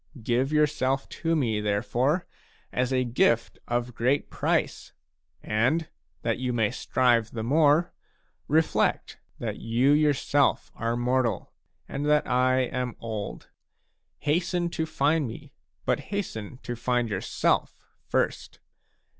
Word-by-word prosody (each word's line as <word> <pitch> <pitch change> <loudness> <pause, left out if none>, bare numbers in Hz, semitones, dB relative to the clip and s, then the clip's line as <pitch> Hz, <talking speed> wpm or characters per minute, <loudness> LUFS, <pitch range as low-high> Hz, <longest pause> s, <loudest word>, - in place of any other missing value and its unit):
Give 125 +5 +1
yourself 145 -3 +1
to 165 0 -1
me, 115 -8 0
therefore, 115 - 0 0.5
as 125 +1 0
a 130 -1 +2
gift 115 -1 +1
of 120 0 -1
great 125 +5 0
price, - - -1 0.5
and, 130 +10 +1 0.3
that - - 0
you 125 -1 -1
may 115 -3 +1
strive 120 -2 +2
the 110 -2 -5
more, 150 +5 +3 0.5
reflect 160 +2 +1 0.2
that - - -4
you 120 +5 +2
yourself 145 -1 +2
are 115 +1 -2
mortal, 120 -4 0 0.3
and 145 +2 -3
that 150 0 +3
I 130 +1 +3
am 125 -1 -2
old. 110 -3 -6 0.7
Hasten 175 +3 0
to 160 -1 -2
find 150 -1 +1
me, 110 - -10 0.3
but - - +1
hasten 130 - -5
to 120 - -4
find 120 0 0
yourself 100 -4 0 0.3
first. - - -1
130 Hz, 120 wpm, -27 LUFS, 115-150 Hz, 0.7 s, more